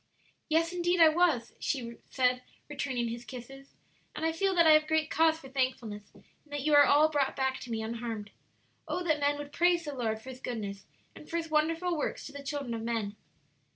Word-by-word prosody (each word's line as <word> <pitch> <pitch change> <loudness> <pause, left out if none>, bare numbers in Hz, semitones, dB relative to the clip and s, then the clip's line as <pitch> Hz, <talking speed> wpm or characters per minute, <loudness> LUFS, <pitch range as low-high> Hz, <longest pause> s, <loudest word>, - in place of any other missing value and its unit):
"Yes, 330 +2 +2
indeed 350 0 +1
I 325 -1 +9
was," 315 -8 +2
she 235 -4 -3
said, 250 -1 +1 0.3
returning 260 -5 -2
his 235 +1 -6
kisses; 260 +3 -11 0.4
"and 320 - -2
I 325 - +2
feel 385 +3 0
that 340 -1 +5
I 315 - +8
have 310 0 +5
great 315 0 +1
cause 320 0 +4
for 280 - -12
thankfulness 255 -6 -2
in - - -18 0.2
that 290 -1 -4
you 305 0 +2
are 290 0 +8
all 300 +2 +5
brought 285 -3 +1
back 265 -1 0
to 245 - -9
me 220 -1 -2
unharmed. 225 -2 -5 0.6
'Oh, 360 - -2
that 310 -3 +1
men 290 0 +1
would 290 0 -7
praise 345 +1 +2
the 295 - -4
Lord 225 -4 -2
for 255 - -11
His 255 - -11
goodness 205 -6 -5 0.3
and 300 - -13
for 335 - -1
His 325 -1 -4
wonderful 330 +3 +1
works 300 - -3
to - - -8
the 285 0 -8
children 280 -3 -4
of 225 - -4
men!'" 225 -3 -2
285 Hz, 215 wpm, -30 LUFS, 240-315 Hz, 0.6 s, I